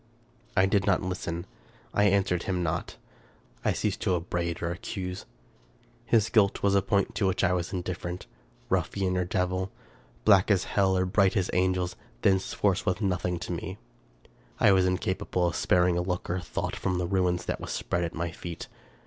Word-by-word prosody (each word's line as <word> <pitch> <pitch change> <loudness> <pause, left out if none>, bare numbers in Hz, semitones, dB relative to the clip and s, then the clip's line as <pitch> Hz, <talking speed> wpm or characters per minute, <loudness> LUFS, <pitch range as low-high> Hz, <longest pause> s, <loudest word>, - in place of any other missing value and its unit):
I 95 - +6
did 100 +1 +1
not 95 -2 +3
listen 85 -2 -3 0.2
— - - -29
I 105 - +3
answered 95 -3 +2
him 90 -2 0
not 85 +1 -2 0.3
— - - -32
I - - +2
ceased - - -1
to 90 - +2
up 85 0 -5
braid 85 0 -1
or 85 - 0
accuse. 90 -1 -5 0.8
His 115 -1 +3
guilt 100 -3 +3
was 100 -1 +4
a 100 - +4
point 100 0 +1
to 100 - +1
which 95 +1 0
I 90 -2 +3
was 85 -1 -2
indifferent. 90 -1 -4 0.4
Ruffian 95 -2 0
or 90 0 +1
devil, 90 +1 -1 0.6
black 100 -2 +6
as 95 -4 +3
hell 95 -2 +2
or 95 - +2
bright 95 +2 +3
as 95 -1 0
angels, 90 0 +1 0.3
thenceforth 95 0 +2
he - - -1
was 90 - -1
nothing 90 -2 0
to 90 - -4
me. 90 +2 -4 0.8
I - - +6
was 95 -1 +4
incapable 90 0 0
of 85 - 0
sparing 90 -1 +3
a - - +1
look 90 -1 -2
or 90 - 0
a - - -4
thought - - -3
from 90 -1 -1
the 90 - 0
ruin 90 -1 +2
that - - -3
was - - -6
spread 85 0 -1
at 85 - -4
my 85 0 -2
feet. 85 0 -7
90 Hz, 195 wpm, -28 LUFS, 90-95 Hz, 0.8 s, I